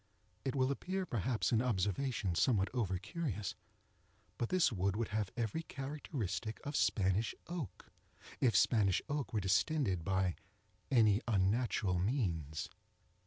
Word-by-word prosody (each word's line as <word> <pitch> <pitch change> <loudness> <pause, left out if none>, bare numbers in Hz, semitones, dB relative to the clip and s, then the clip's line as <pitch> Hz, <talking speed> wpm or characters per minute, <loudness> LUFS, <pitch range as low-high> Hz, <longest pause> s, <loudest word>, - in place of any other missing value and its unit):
It 135 0 -2
will 130 0 +2
appear 185 +6 -2
perhaps 120 - 0
an 115 -1 +4
observation 110 -1 0
somewhat 100 +1 +3
over 100 -7 0
curious, 105 - -3 0.9
but 120 - 0
this 185 -6 +3
wood 100 -1 0
would 115 0 -1
have 105 -2 -1
every 115 +7 -1
characteristic 135 - -4
of 145 +1 -3
Spanish 100 0 +2
oak, 170 -5 -6 0.5
if 120 -4 +3
Spanish 100 -6 +4
oak 145 -2 -2
were 110 - +1
distended 95 - +1
by 95 0 +1 0.6
any 110 -4 +5
unnatural 100 -2 +1
means. 90 - -1
110 Hz, 125 wpm, -35 LUFS, 95-135 Hz, 0.9 s, any